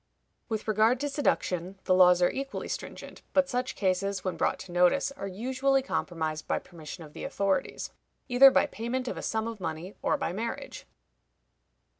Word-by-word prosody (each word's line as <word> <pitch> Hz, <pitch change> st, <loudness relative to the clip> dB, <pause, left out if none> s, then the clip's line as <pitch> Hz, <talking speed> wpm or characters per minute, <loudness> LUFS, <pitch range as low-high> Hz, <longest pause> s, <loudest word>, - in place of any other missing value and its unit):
With 220 Hz, -1 st, -3 dB
regard 220 Hz, +3 st, +3 dB
to 290 Hz, -, -1 dB
seduction, 190 Hz, -, -1 dB
the 185 Hz, -, +2 dB
laws 180 Hz, -1 st, +6 dB
are 175 Hz, -, +4 dB
equally 275 Hz, 0 st, -4 dB
stringent; -, -, -7 dB
but 280 Hz, -1 st, +4 dB
such 250 Hz, 0 st, -2 dB
cases, 190 Hz, 0 st, 0 dB
when 185 Hz, -2 st, -2 dB
brought 165 Hz, -, +1 dB
to 180 Hz, -, -10 dB
notice, 180 Hz, +11 st, +3 dB
are 275 Hz, -8 st, -6 dB
usually 260 Hz, +7 st, +1 dB
compromised 160 Hz, -, -3 dB
by -, -, +1 dB
permission 165 Hz, -1 st, -9 dB
of 150 Hz, -1 st, -13 dB
the -, -, -8 dB
authorities, 195 Hz, -1 st, -1 dB, 0.4 s
either 265 Hz, +1 st, +8 dB
by -, -, +3 dB
payment 245 Hz, +3 st, -3 dB
of -, -, -2 dB
a -, -, -4 dB
sum 220 Hz, 0 st, -1 dB
of 230 Hz, -2 st, -6 dB
money, 165 Hz, +3 st, -4 dB
or 290 Hz, -, +1 dB
by 270 Hz, -11 st, -2 dB
marriage. 230 Hz, +4 st, -5 dB
200 Hz, 175 wpm, -29 LUFS, 180-260 Hz, 0.4 s, either